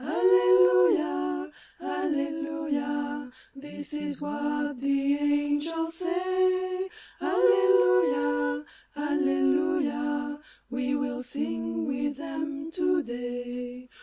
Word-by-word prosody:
Allelui^a, 125 Hz, -12 st, +4 dB, 0.3 s
alleluia, 290 Hz, -, -2 dB, 0.2 s
this 290 Hz, +1 st, -9 dB
is 295 Hz, -2 st, -4 dB
what 290 Hz, -1 st, -2 dB
the 275 Hz, +1 st, +1 dB
angels 290 Hz, +3 st, 0 dB
say: 370 Hz, +1 st, 0 dB, 0.3 s
Alleluia, 120 Hz, -6 st, +3 dB, 0.3 s
alleluia, 290 Hz, -, 0 dB, 0.3 s
we 260 Hz, +1 st, -1 dB
will 265 Hz, -3 st, -2 dB
sing 115 Hz, -, -3 dB
with 275 Hz, +1 st, -2 dB
them 300 Hz, 0 st, -5 dB
to 345 Hz, -1 st, +1 dB
day. 245 Hz, 0 st, -6 dB
285 Hz, 75 wpm, -27 LUFS, -, 0.3 s, Allelui^a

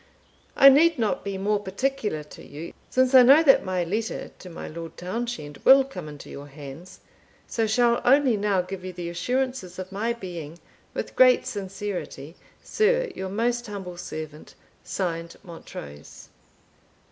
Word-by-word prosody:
"I 275 Hz, -, +9 dB
need 320 Hz, +4 st, +5 dB
not 220 Hz, -3 st, -1 dB
be 200 Hz, -1 st, -4 dB
more 205 Hz, +2 st, 0 dB
particular 205 Hz, -, -2 dB
to 150 Hz, -, -13 dB
you, 155 Hz, +4 st, -9 dB, 0.2 s
since 255 Hz, 0 st, +2 dB
I 260 Hz, -, +10 dB
know 275 Hz, +6 st, +7 dB
that 270 Hz, -4 st, +6 dB
my 185 Hz, -2 st, -1 dB
Letter 215 Hz, +6 st, -3 dB
to 180 Hz, -, -10 dB
my 165 Hz, -, -8 dB
Lord 165 Hz, 0 st, -8 dB
Townshend 185 Hz, -6 st, -5 dB
will 270 Hz, +1 st, +8 dB
come 180 Hz, -, -8 dB
into 145 Hz, -1 st, -11 dB
your 140 Hz, +1 st, -9 dB
hands, 145 Hz, +5 st, -11 dB, 0.4 s
so 225 Hz, -1 st, -1 dB
shall 235 Hz, +2 st, +3 dB
only 265 Hz, -2 st, +4 dB
now 200 Hz, -3 st, +1 dB
give 185 Hz, 0 st, -7 dB
you 185 Hz, 0 st, -6 dB
the 175 Hz, -1 st, -5 dB
assurances 250 Hz, -1 st, -2 dB
of 185 Hz, 0 st, -7 dB
my 220 Hz, +4 st, -1 dB
being, 175 Hz, -7 st, -8 dB, 0.4 s
with -, -, -5 dB
great 255 Hz, -1 st, +6 dB
sincerity, 190 Hz, -6 st, -5 dB, 0.3 s
"Sr, 480 Hz, +2 st, +1 dB
yr 190 Hz, -, -4 dB
most 240 Hz, +4 st, -1 dB
humble 190 Hz, -4 st, -7 dB
servant, 155 Hz, -3 st, -8 dB, 0.3 s
(Signed) 170 Hz, -3 st, -3 dB
"Montrose." 75 Hz, -, -11 dB
195 Hz, 155 wpm, -25 LUFS, 170-245 Hz, 0.4 s, I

